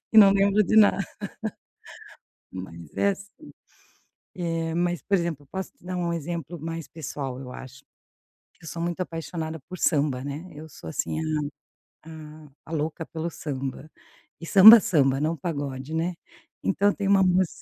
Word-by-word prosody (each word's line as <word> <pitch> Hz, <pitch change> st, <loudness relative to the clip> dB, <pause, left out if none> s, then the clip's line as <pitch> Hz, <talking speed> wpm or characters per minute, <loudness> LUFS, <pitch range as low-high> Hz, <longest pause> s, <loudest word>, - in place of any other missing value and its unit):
e 220 Hz, -, +8 dB
não 200 Hz, -2 st, +9 dB
lembro 200 Hz, +1 st, +4 dB
de 215 Hz, -, 0 dB
nada. 205 Hz, -2 st, +6 dB, 1.5 s
Mas 85 Hz, -4 st, -9 dB
é 200 Hz, -, +3 dB
assim, 200 Hz, +10 st, -10 dB, 0.8 s
eh, 165 Hz, -3 st, -2 dB
mas 175 Hz, 0 st, 0 dB
por 200 Hz, -, -1 dB
exemplo 170 Hz, -5 st, 0 dB
eu -, -, -27 dB
posso 190 Hz, +6 st, -6 dB
te 275 Hz, -, -28 dB
dar 180 Hz, 0 st, -4 dB
um 175 Hz, -1 st, -1 dB
exemplo 170 Hz, 0 st, -4 dB
mais 165 Hz, 0 st, -5 dB
pessoal 140 Hz, -4 st, -6 dB
eu 125 Hz, -2 st, -8 dB
acho. 130 Hz, +1 st, -11 dB, 0.8 s
Eu -, -, -13 dB
sou 170 Hz, -, -5 dB
muito 175 Hz, +1 st, -3 dB
apaixonada 165 Hz, -2 st, -4 dB
por 185 Hz, -, -7 dB
samba 145 Hz, -6 st, +1 dB
né, 150 Hz, +6 st, -6 dB
eu 155 Hz, +2 st, -10 dB
sou 80 Hz, -, -11 dB
assim 155 Hz, -, -2 dB, 0.9 s
a -, -, -11 dB
a 155 Hz, -1 st, -11 dB, 0.2 s
a -, -, -10 dB
louca 160 Hz, +1 st, -2 dB
pelo 165 Hz, +1 st, -4 dB
samba, 135 Hz, -2 st, -5 dB, 0.5 s
e -, -, -6 dB
samba, 210 Hz, +6 st, +10 dB
samba 135 Hz, -9 st, +2 dB
não 155 Hz, +3 st, 0 dB
pagode, 140 Hz, -2 st, -4 dB
né, 170 Hz, +2 st, -1 dB, 0.5 s
então 200 Hz, +1 st, +2 dB
tem 200 Hz, -, -3 dB
uma 195 Hz, -1 st, +5 dB
mus 185 Hz, -1 st, +3 dB
165 Hz, 165 wpm, -25 LUFS, 145-185 Hz, 1.5 s, samba